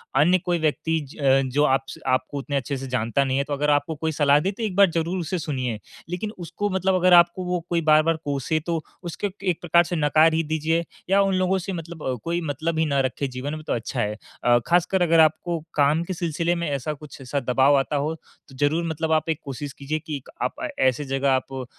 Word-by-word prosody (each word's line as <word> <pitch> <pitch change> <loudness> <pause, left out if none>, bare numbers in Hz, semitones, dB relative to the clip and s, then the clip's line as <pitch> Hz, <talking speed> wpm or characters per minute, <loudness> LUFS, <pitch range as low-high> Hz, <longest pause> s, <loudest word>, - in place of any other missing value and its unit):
अन्य 165 +7 +5
कोई 175 -1 +1
व्यक्ति 160 +1 0
ज 135 -2 +3
जो 145 +2 +3
आप 135 -1 +2
से - - -9
आपको 130 +2 -1
उतने 140 +1 -4
अच्छे 135 +1 -3
से 135 +1 -6
जानता 125 +1 0
नहीं 135 -1 0
है, 140 - +2
तो 145 - -5
अगर 145 +1 0
आपको 145 +2 +1
कोई 160 +2 -2
सलाह 145 -1 +4
दे, 190 +6 -1
तो 215 +3 -7
एक 205 -4 -2
बार 200 -1 +6
ज़रूर 165 +3 -1
उसे 175 +2 -2
सुनिए। 130 -8 -3 0.3
लेकिन 180 +5 -3
उसको 175 +4 -3
मतलब 190 0 +1
अगर 185 0 +4
आपको 175 +1 +5
वो 180 0 -1
कोई 170 -1 +1
बार-बार 155 +1 +4
कोसे, 145 +2 -1
तो 165 0 -3 0.2
उसको 175 +4 -3 0.2
एक 180 -4 0
प्रकार 170 0 +4
से 175 - -4
नकार 155 +1 +4
ही 165 +1 +1
दीजिए 160 +2 0 0.2
या 195 +1 +5
उन 195 -1 +2
लोगों 185 +1 +2
से 190 +2 -5
मतलब 160 -7 -5
कोई 170 +1 -1
मतलब 160 +1 -2
ही 160 - +3
ना 140 -2 +1
रखें 135 +1 -2
जीवन 130 +4 -5
में, 155 - -8
तो - - 0
अच्छा 120 +2 -3
है। 105 -1 -1 0.3
अ, 120 0 +5
ख़ासकर 180 +2 +2
अगर 165 -1 +4
आपको 160 +2 +2 0.2
काम 150 +3 +3
के 185 - -4
सिलसिले 170 0 -1
में 170 -2 -2
ऐसा 140 +1 -2
कुछ 150 -1 -12
ऐसा 135 +2 -2
दबाव 135 +2 +3
आता 135 +2 -2
हो, 145 +3 0
तो 145 -3 -21
ज़रूर 155 +4 +2
मतलब 160 0 -2
आप 155 0 +1
एक 160 - 0
कोशिश 140 +1 -6
कीजिए 145 +3 -2
कि 155 -1 -6
एक 135 - -15
आप - - -1
अ, - - -1
ऐसी 130 +2 +2
जगह 135 0 0
आप 130 +1 -1
अ, 130 -1 -4
155 Hz, 240 wpm, -24 LUFS, 140-170 Hz, 0.3 s, बार